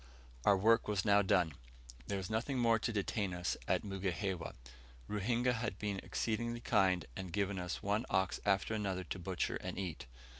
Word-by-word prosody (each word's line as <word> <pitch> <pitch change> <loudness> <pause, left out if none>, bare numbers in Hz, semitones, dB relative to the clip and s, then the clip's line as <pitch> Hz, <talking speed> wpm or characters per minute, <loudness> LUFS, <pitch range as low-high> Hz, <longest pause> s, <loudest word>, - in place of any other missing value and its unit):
Our 100 - +6
work 115 +4 +4
was 105 -1 0
now 100 -1 +6
done; 90 -5 +3 0.5
there 100 - -1
was 95 -2 -3
nothing 115 +5 -1
more 115 -2 +4
to 115 - -1
detain 100 -2 -1
us 90 0 -1
at - - +2
Mugihewa. 95 -2 -2 0.5
Ruhinga 120 +4 +1
had 115 -5 -2
been 100 -2 -2
exceedingly 120 +1 -1
kind, 95 -7 +3
and 95 -2 -5
given 100 +1 0
us 90 0 -4
one 105 +5 0
ox 95 0 +1
after 100 +1 +2
another 95 -4 -1
to 90 - -5
butcher 90 0 -1
and - - -6
eat. 90 -9 -4
100 Hz, 175 wpm, -35 LUFS, 95-110 Hz, 0.5 s, Our